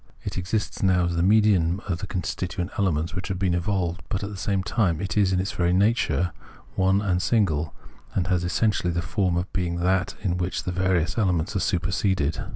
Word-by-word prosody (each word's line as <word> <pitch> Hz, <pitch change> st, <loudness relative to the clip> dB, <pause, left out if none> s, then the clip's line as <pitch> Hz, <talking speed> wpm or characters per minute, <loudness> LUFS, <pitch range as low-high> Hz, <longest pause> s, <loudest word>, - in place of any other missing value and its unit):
It -, -, -4 dB
exists 95 Hz, +4 st, -2 dB
now 95 Hz, -2 st, +3 dB
as 85 Hz, 0 st, -1 dB
the 85 Hz, -, +1 dB
medium 95 Hz, -3 st, +3 dB
of 90 Hz, -3 st, -1 dB
the 100 Hz, -, -5 dB
constituent 90 Hz, 0 st, -3 dB
elements 85 Hz, -5 st, 0 dB
which 90 Hz, 0 st, -4 dB
have 95 Hz, -, -2 dB
been 95 Hz, -1 st, +1 dB
evolved. 90 Hz, 0 st, -1 dB
But 100 Hz, -, -2 dB
at 100 Hz, -, -4 dB
the -, -, -6 dB
same 95 Hz, 0 st, -1 dB
time 95 Hz, -6 st, +1 dB
it 95 Hz, -3 st, -3 dB
is 100 Hz, -3 st, +3 dB
in 90 Hz, -, +1 dB
its 95 Hz, -, -1 dB
very 85 Hz, 0 st, +1 dB
nature 95 Hz, -3 st, +2 dB, 0.4 s
one 95 Hz, +2 st, +2 dB
and 90 Hz, -3 st, +1 dB
single, 85 Hz, -8 st, +1 dB, 0.4 s
and 90 Hz, -, +1 dB
has 90 Hz, -1 st, +1 dB
essentially 90 Hz, +1 st, +1 dB
the 85 Hz, 0 st, -1 dB
form 95 Hz, -2 st, 0 dB
of 90 Hz, +1 st, -3 dB
being 90 Hz, -2 st, -1 dB
that 90 Hz, +2 st, 0 dB
in 90 Hz, -3 st, 0 dB
which 90 Hz, +1 st, -2 dB
these 90 Hz, -, -3 dB
various 95 Hz, +2 st, +1 dB
elements 90 Hz, -4 st, 0 dB
are -, -, +2 dB
superseded. 90 Hz, -3 st, 0 dB
90 Hz, 205 wpm, -25 LUFS, 85-95 Hz, 0.4 s, now